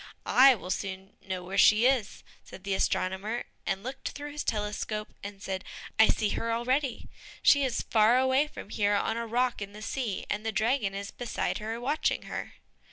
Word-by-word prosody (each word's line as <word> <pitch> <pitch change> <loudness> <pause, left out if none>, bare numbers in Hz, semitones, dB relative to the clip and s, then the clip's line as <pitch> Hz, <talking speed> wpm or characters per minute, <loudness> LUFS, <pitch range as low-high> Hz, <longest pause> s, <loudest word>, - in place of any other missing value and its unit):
"I 265 0 +7
will 185 -3 -6
soon 190 0 -4
know 185 -1 -5
where 190 +2 -2
she 215 +3 +6
is," 255 -6 +1 0.2
said 185 - -12
the 195 -1 -1
astronomer, 190 +4 -1 0.2
and 195 +1 -1
looked 260 +3 -5
through 290 +1 -7
his 295 0 -4
telescope 210 0 -3
and 200 0 -8
said, 190 -1 -3 0.4
"I 220 - +8
see 210 - +1
her 230 +2 -2
already, 250 +2 0 0.4
she 285 -1 +6
is 260 -3 -1
far 225 +2 +4
away 260 +3 +3
from 220 - -10
here 205 -1 +2
on 225 +2 0
a 235 0 -3
rock 245 0 0
in 200 0 -6
the 210 - -10
sea, 225 -5 -3
and 210 +1 -2
the 225 - -1
dragon 215 -1 0
is 200 +1 -5
beside 245 -1 -3
her 220 +2 -4
watching 285 +6 0
her." - - -6
220 Hz, 190 wpm, -29 LUFS, 200-250 Hz, 0.4 s, I